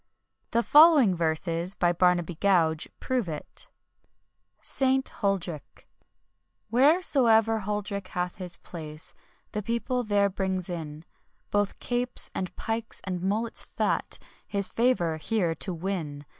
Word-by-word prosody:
The 235 - +1
following 295 - +7
verses, 170 +2 0
by 175 0 +2
Barnaby 175 0 +2
Gouge 165 -3 +2
prove 250 -8 -1
it: 150 - -7 0.9
ST. 265 0 +2
HULDRYCHE. 185 - -3 0.9
"Wheresoever 240 - +5
Huldryche 200 -1 -3
hath 180 0 -3
his 180 -2 -4
place, 155 -2 -7 0.4
the 210 - -3
people 235 +4 -1
there 205 -2 +2
brings 185 -2 -2
in 155 -2 -6 0.5
Both 205 -1 0
capes 245 0 -1
and 185 -2 -4
pykes, 225 0 -3
and 180 -2 -4
mullets 215 +5 -1
fat, - - -1 0.3
his 200 -1 0
favour 225 -10 +1
here 175 -1 0
to 185 - -2
win. 165 -5 -4
195 Hz, 115 wpm, -27 LUFS, 170-225 Hz, 0.9 s, following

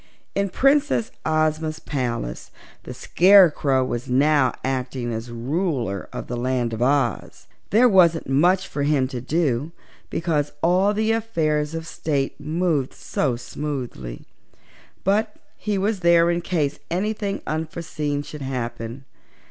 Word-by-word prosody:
In 200 0 0
Princess 275 -1 +2 0.2
Ozma's 155 0 0
palace 120 - -4 0.4
the - - -7
Scarecrow 165 -8 +5
was 120 -1 -4
now 140 0 +3
acting 130 -2 -2
as 115 +2 -5
Ruler 120 - -2
of - - -6
the 120 - -4
Land 120 -1 -1
of 110 - -4
Oz. 130 -3 0 0.2
There 235 +4 +5
wasn't 175 -6 +4
much 175 +8 +3
for 145 - -4
him 140 -2 +2
to 125 -3 -5
do, 145 0 0 0.4
because 150 -4 -1
all 185 +4 +3
the 220 +1 +1
affairs 160 -9 0
of 165 0 -4
state 145 -5 -2
moved 155 -2 -1
so 130 -5 -1
smoothly, 120 - -6 0.8
but 210 +3 +1 0.2
he 210 -2 -2
was 200 +1 0
there 170 -1 +4
in 175 0 -1
case 155 -6 -1
anything 200 +3 -2
unforeseen 155 -2 -3
should 150 0 -9
happen. 120 -1 -5
150 Hz, 130 wpm, -23 LUFS, 130-180 Hz, 0.8 s, Scarecrow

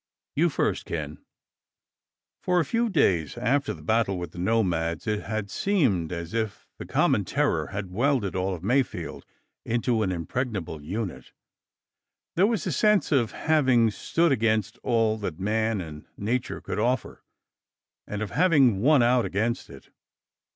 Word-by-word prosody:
You - - +3
first, - - -1
Ken." - - -5 1.2
For 180 -3 +2
a 165 - +1
few 230 - 0
days 90 - +1
after 140 +4 +1
the - - -9
battle 110 -4 +1
with 90 0 -5
the 85 - -10
nomads, 90 -5 0
it 105 -2 -1
had 110 -2 -3
seemed 125 - +1
as 85 +1 -5
if 110 -3 -3
the - - -7
common - - +2
terror - - 0
had 100 -2 -5
welded 120 -1 +1
all 95 0 -1
of 85 - -11
Mayfield 125 +5 -1 0.4
into 120 0 0
an 95 -3 0
impregnable 90 - -3
unit. 95 +5 -5 1.0
There 190 +4 +4
was 220 -8 -1
a - - -1
sense 210 -2 +2
of 125 -7 +2
having 130 -8 +3
stood 165 +9 +1
against 110 -3 +1
all 115 -2 +1
that 90 -6 -4
man 110 +2 0
and 75 -3 -9
nature 120 +5 -2
could - - -4
offer, 125 +4 -1 0.8
and 105 +1 -3
of 105 - -6
having 145 - +4
won 140 0 +5
out 120 0 +3
against 110 +6 -1
it. 70 - -14
110 Hz, 150 wpm, -26 LUFS, 95-130 Hz, 1.2 s, won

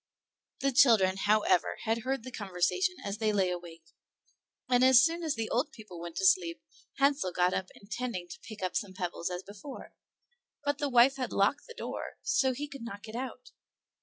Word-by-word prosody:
The 275 - +2
children, 225 -8 +5
however, 205 -2 +2
had 225 0 0
heard 260 +1 -2
the 255 - -8
conversation 205 - 0
as 200 +2 -4
they 215 -1 +2
lay 190 -3 +1
awake, 170 -2 -7 0.8
and 250 0 +4
as 260 -2 +8
soon 335 +1 +1
as 315 -3 -1
the 225 -1 -2
old 270 +6 0
people 215 - -11
went 170 -1 -7
to - - -1
sleep 370 -3 +3 0.4
Hansel 275 -8 +2
got 180 +1 +2
up 190 - -2
intending' 200 -3 -5
to 175 - -9
pick 215 -4 -10
up 185 - -2
some 190 -2 -2
pebbles 180 -2 -3
as 180 +1 -5
before; 205 +7 -10 0.7
but 285 0 -1
the 290 - 0
wife 255 +2 +5
had 255 -2 -3
locked 200 +9 +1
the 470 - -11
door, - - -6
so 265 - +2
that 255 - -3
he 295 +1 -3
could 280 -3 -10
not 205 -3 -7
get 220 0 -9
out. 255 0 -6
230 Hz, 195 wpm, -30 LUFS, 190-270 Hz, 0.8 s, as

